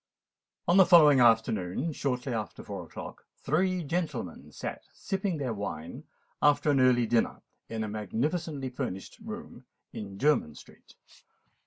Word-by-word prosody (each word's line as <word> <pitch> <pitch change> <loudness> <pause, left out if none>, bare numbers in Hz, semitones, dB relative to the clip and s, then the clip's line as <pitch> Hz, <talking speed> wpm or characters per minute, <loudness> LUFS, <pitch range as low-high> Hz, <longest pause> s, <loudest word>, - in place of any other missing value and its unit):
On 175 - +5
the 190 - +8
following 150 -6 +7
afternoon, 115 - +2
shortly 130 -2 -2
after 110 -2 -4
four - - -6
o'clock, - - -10
three 180 +4 0
gentlemen 150 - -3
sate, - - -5 0.2
sipping 195 -3 -2
their 130 -5 -2
wine 100 -6 -6 0.4
after 145 0 +4
an 140 - +3
early 125 -2 +4
dinner, 115 0 0 0.3
in 110 -1 -3
a - - -3
magnificently 135 - -2
furnished 125 -7 -5
room - - -8 0.3
in 100 -2 -7
Jermyn 135 - +2
Street. - - -16
130 Hz, 135 wpm, -29 LUFS, 110-155 Hz, 0.4 s, the